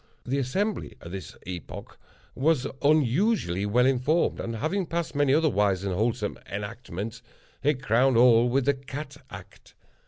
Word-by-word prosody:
The 135 Hz, +3 st, -1 dB
Assembly, 195 Hz, -, -2 dB
at 85 Hz, -, -10 dB
this 95 Hz, -4 st, -8 dB
epoch, 90 Hz, -1 st, -8 dB, 0.4 s
was 140 Hz, -1 st, +1 dB, 0.2 s
unusually 145 Hz, -, +2 dB
well 125 Hz, +4 st, +3 dB
informed, 135 Hz, +6 st, +1 dB
and, 115 Hz, -, -4 dB
having 175 Hz, -, -1 dB
passed 170 Hz, 0 st, -3 dB
many 145 Hz, -2 st, +2 dB
other 155 Hz, +3 st, +4 dB
wise 100 Hz, -, +1 dB
and 100 Hz, -2 st, -1 dB
wholesome 110 Hz, +2 st, -1 dB
enactments, 105 Hz, +1 st, -6 dB, 0.4 s
it 140 Hz, -1 st, 0 dB
crowned 125 Hz, +3 st, +3 dB
all 120 Hz, 0 st, +6 dB
with 130 Hz, +1 st, +1 dB
the 140 Hz, -, +4 dB
Cat 140 Hz, +1 st, -8 dB
Act. -, -, -13 dB
125 Hz, 150 wpm, -26 LUFS, 110-145 Hz, 0.4 s, all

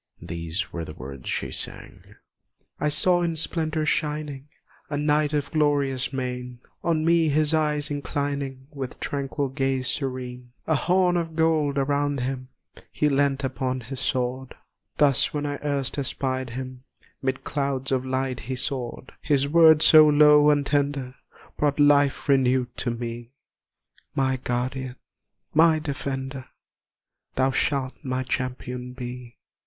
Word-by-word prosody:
These 85 Hz, +2 st, -4 dB
were 85 Hz, -, -3 dB
the 75 Hz, -1 st, -8 dB
words 65 Hz, 0 st, -8 dB
she -, -, -2 dB
sang: -, -, -7 dB, 0.6 s
"I 150 Hz, -, +1 dB
saw 175 Hz, +4 st, +4 dB
in 170 Hz, -1 st, 0 dB
splendour 155 Hz, -1 st, -1 dB
shining, 150 Hz, -2 st, -2 dB, 0.4 s
a 145 Hz, -, -2 dB
Knight 150 Hz, 0 st, +2 dB
of 145 Hz, -2 st, -1 dB
glorious 145 Hz, -4 st, +1 dB
mien, 125 Hz, -2 st, -4 dB, 0.2 s
On 160 Hz, -2 st, +1 dB
me 165 Hz, -1 st, +4 dB
his 150 Hz, +1 st, +2 dB
eyes 150 Hz, -2 st, +1 dB
inclining 140 Hz, -2 st, -3 dB
with 135 Hz, -4 st, -6 dB
tranquil 140 Hz, 0 st, -2 dB
gaze 135 Hz, -1 st, -1 dB
serene; 125 Hz, -2 st, -3 dB
A 160 Hz, -, +1 dB
horn 180 Hz, +3 st, +2 dB
of 165 Hz, -2 st, -3 dB
gold 155 Hz, -3 st, +2 dB
around 140 Hz, 0 st, 0 dB
him, 130 Hz, 0 st, -3 dB, 0.4 s
he 150 Hz, -, +1 dB
leant 140 Hz, -1 st, +1 dB
upon 130 Hz, 0 st, -2 dB
his 130 Hz, +3 st, -7 dB
sword, 130 Hz, 0 st, -2 dB, 0.4 s
Thus 145 Hz, 0 st, +3 dB
when 145 Hz, 0 st, -1 dB
I 145 Hz, -1 st, -3 dB
erst 140 Hz, -1 st, -1 dB
espied 130 Hz, -1 st, -2 dB
him 130 Hz, 0 st, -7 dB, 0.4 s
'mid 130 Hz, 0 st, -2 dB
clouds 140 Hz, -2 st, -2 dB
of 130 Hz, -1 st, +1 dB
light 130 Hz, -1 st, -2 dB
he 130 Hz, +3 st, -4 dB
soared, 130 Hz, -1 st, -2 dB
His 140 Hz, -2 st, +2 dB
words 160 Hz, 0 st, +6 dB
so 155 Hz, -1 st, +9 dB
low 150 Hz, 0 st, +6 dB
and 145 Hz, -1 st, +3 dB
tender 140 Hz, -3 st, 0 dB, 0.5 s
brought 145 Hz, -1 st, +1 dB
life 145 Hz, -1 st, +4 dB
renewed 130 Hz, -3 st, +2 dB
to 125 Hz, -, -1 dB
me; 120 Hz, +1 st, -5 dB, 0.8 s
My 130 Hz, -1 st, +1 dB
guardian, 125 Hz, +1 st, -3 dB, 0.6 s
my 160 Hz, +1 st, +5 dB
defender, 135 Hz, -3 st, -4 dB, 0.9 s
thou 130 Hz, +1 st, +2 dB
shalt 130 Hz, -1 st, 0 dB
my 130 Hz, -1 st, -2 dB
Champion 125 Hz, -1 st, -4 dB
be!" 125 Hz, -1 st, -8 dB
135 Hz, 140 wpm, -25 LUFS, 130-150 Hz, 0.9 s, so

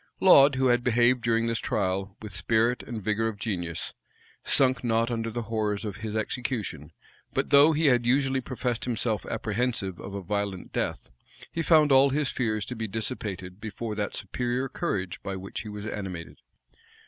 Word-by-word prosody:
Laud, 140 Hz, -7 st, +7 dB
who 130 Hz, 0 st, +1 dB
had 120 Hz, 0 st, +3 dB
behaved 120 Hz, +1 st, +3 dB
during 115 Hz, -1 st, +1 dB
his 115 Hz, -1 st, 0 dB
trial 95 Hz, 0 st, -2 dB
with 105 Hz, -3 st, -7 dB
spirit 115 Hz, +6 st, +1 dB
and 110 Hz, -4 st, -6 dB
vigor 110 Hz, +2 st, +1 dB
of 110 Hz, -2 st, -4 dB
genius, 90 Hz, -6 st, -3 dB, 0.5 s
sunk 130 Hz, -2 st, +3 dB
not 115 Hz, 0 st, +1 dB
under 115 Hz, -1 st, -2 dB
the 120 Hz, +1 st, -4 dB
horrors 110 Hz, -2 st, -2 dB
of 100 Hz, -2 st, -5 dB
his 110 Hz, -1 st, -5 dB
execution 110 Hz, -, -3 dB, 0.4 s
but -, -, 0 dB
though 145 Hz, +2 st, +8 dB
he 155 Hz, +1 st, +1 dB
had 125 Hz, -4 st, +4 dB
usually 135 Hz, +1 st, +2 dB
professed 125 Hz, -2 st, -3 dB
himself 115 Hz, -2 st, -1 dB
apprehensive 110 Hz, -4 st, -2 dB
of 95 Hz, +1 st, -7 dB
a 100 Hz, -, -5 dB
violent 100 Hz, 0 st, -3 dB
death, -, -, -3 dB, 0.4 s
he 165 Hz, -, -2 dB
found 155 Hz, -3 st, +5 dB
all 135 Hz, +1 st, +7 dB
his 140 Hz, -1 st, 0 dB
fears 110 Hz, -4 st, -1 dB
to 125 Hz, -, -5 dB
be 110 Hz, -1 st, -3 dB
dissipated 100 Hz, -3 st, -4 dB
before 110 Hz, 0 st, -5 dB
that 105 Hz, -1 st, -3 dB
superior 125 Hz, +6 st, -2 dB
courage 95 Hz, -7 st, -3 dB
by 95 Hz, -, -4 dB
which 95 Hz, +1 st, -6 dB
he 105 Hz, -, -8 dB
was 105 Hz, 0 st, -7 dB
animated. 95 Hz, -6 st, -6 dB
115 Hz, 175 wpm, -27 LUFS, 100-125 Hz, 0.5 s, though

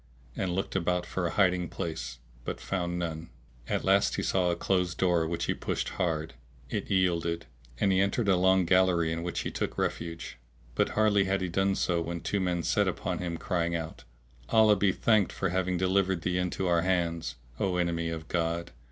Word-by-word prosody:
and 90 Hz, -2 st, -1 dB
looked 95 Hz, +1 st, -2 dB
about 90 Hz, -1 st, 0 dB
for 90 Hz, 0 st, -2 dB
a -, -, -4 dB
hiding 90 Hz, -3 st, +2 dB
place 80 Hz, -7 st, -5 dB, 0.3 s
but -, -, -4 dB
found 90 Hz, -2 st, -2 dB
none. 85 Hz, -1 st, -4 dB, 0.4 s
At -, -, -1 dB
last -, -, +3 dB
he -, -, -2 dB
saw 90 Hz, -2 st, +2 dB
a 85 Hz, -, +1 dB
closed 90 Hz, -3 st, 0 dB
door 85 Hz, -3 st, +2 dB
which 85 Hz, +1 st, -2 dB
he -, -, +1 dB
pushed -, -, -2 dB
hard: 80 Hz, -3 st, -2 dB, 0.4 s
it -, -, -3 dB
yielded. 85 Hz, -3 st, +1 dB, 0.3 s
and 100 Hz, -, +3 dB
he 95 Hz, 0 st, +3 dB
entered 100 Hz, +3 st, +1 dB
a 95 Hz, -, +5 dB
long 95 Hz, 0 st, +4 dB
gallery 90 Hz, -2 st, +3 dB
in 80 Hz, 0 st, -2 dB
which 85 Hz, 0 st, -2 dB
he -, -, -4 dB
took -, -, -3 dB
refuge, 85 Hz, -7 st, -3 dB, 0.3 s
but -, -, +1 dB
hardly 105 Hz, -2 st, +4 dB
had 95 Hz, 0 st, 0 dB
he 90 Hz, -, -1 dB
done 95 Hz, +3 st, +1 dB
so, 85 Hz, -3 st, +1 dB
when 85 Hz, 0 st, -4 dB
two 100 Hz, -, -1 dB
men 90 Hz, -2 st, 0 dB
set -, -, +2 dB
upon -, -, -2 dB
him 85 Hz, -2 st, -3 dB
crying 85 Hz, -2 st, -1 dB
out, 80 Hz, -1 st, -5 dB, 0.5 s
"Allah 110 Hz, -2 st, +6 dB
be 100 Hz, 0 st, +3 dB
thanked 105 Hz, -1 st, +2 dB
for 95 Hz, -, -1 dB
having 90 Hz, 0 st, 0 dB
delivered 95 Hz, -1 st, +1 dB
thee 90 Hz, 0 st, 0 dB
into 90 Hz, +1 st, -1 dB
our 85 Hz, -1 st, +3 dB
hands, 85 Hz, -2 st, 0 dB, 0.2 s
O 95 Hz, -2 st, 0 dB
enemy 85 Hz, -1 st, 0 dB
of 80 Hz, -1 st, -5 dB
God! 85 Hz, 0 st, -1 dB
90 Hz, 195 wpm, -29 LUFS, 85-95 Hz, 0.5 s, Allah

